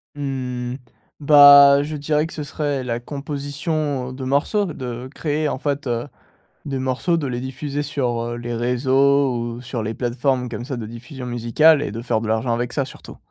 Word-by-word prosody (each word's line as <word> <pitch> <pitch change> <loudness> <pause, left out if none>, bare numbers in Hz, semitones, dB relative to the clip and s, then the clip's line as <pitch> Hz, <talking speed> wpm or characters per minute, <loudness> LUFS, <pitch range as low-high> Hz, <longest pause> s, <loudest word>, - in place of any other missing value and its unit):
Mmh. 125 -3 -4 0.4
Bah, 140 -1 +8
je 155 +1 -5
dirais 150 +1 0
que - - -11
ce 150 - -5
serait 145 -3 -2
la 120 -1 -2
composition, 145 0 -3
heu, - - -8
de 130 0 -7
morceaux. 145 +10 +1
Ce 125 -4 -6
créer, 150 +2 -2
en 130 - -3
fait, 145 -2 -2
heu, 120 +3 -2 0.6
des 135 -2 -3
morceaux, 130 +7 0
de 145 -4 -2
les 120 -1 -3
diffuser 140 +3 -4
sur, 125 -5 -2
heu, - - -5
les 120 0 -5
réseaux, 130 +3 +2
ou 120 +1 -4
sur 120 -2 -4
les 110 +1 -3
plateformes 125 +1 -1
comme 120 +1 -6
ça 130 -3 -4
de 110 - -5
diffusion 120 +3 -9
musicale 125 +6 +3
et 145 - -3
de 115 - -5
faire 115 -2 -1
de 115 - -4
l'argent 110 +2 0
avec 120 +1 -2
ça 140 -3 0
surtout. - - -12
130 Hz, 195 wpm, -21 LUFS, 120-145 Hz, 0.6 s, Bah